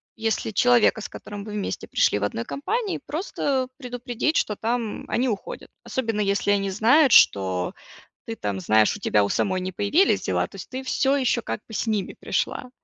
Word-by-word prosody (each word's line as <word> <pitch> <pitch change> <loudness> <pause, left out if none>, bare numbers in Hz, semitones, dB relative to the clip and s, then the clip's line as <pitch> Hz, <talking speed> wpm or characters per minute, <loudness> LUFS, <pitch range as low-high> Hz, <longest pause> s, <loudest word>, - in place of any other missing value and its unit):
если 225 0 -1
человека, 240 0 +4
с - - -6
которым 205 -1 -8
вы 210 - -8
вместе 205 - -4
пришли - - +2
в - - -4
одной 115 +3 -2
компании, 420 - -2
просто 285 -5 -2
предупредить, 245 +2 -2
что 210 - 0
там 230 0 -2
они 255 +2 +1
уходят, 210 -5 -5
особенно, 225 -5 -2
если 200 0 +1
они 195 -1 +1
знают, 245 +8 +4
что 95 - +4 0.5
ты 225 - -6
там, 100 - -3
знаешь, 110 +3 +3
у - - -12
тебя 105 -1 +2
у - - -1
самой 185 - 0
не 185 +1 -4
появились 205 - +2
дела, - - 0
то - - -23
есть - - -9
ты 260 +1 -5
всё 270 +1 +1
еще 250 -3 +1
как - - -4
бы 225 - -10
с 225 - -2
ними 210 -4 -1
пришла, 250 - -2
220 Hz, 190 wpm, -24 LUFS, 195-255 Hz, 0.5 s, человека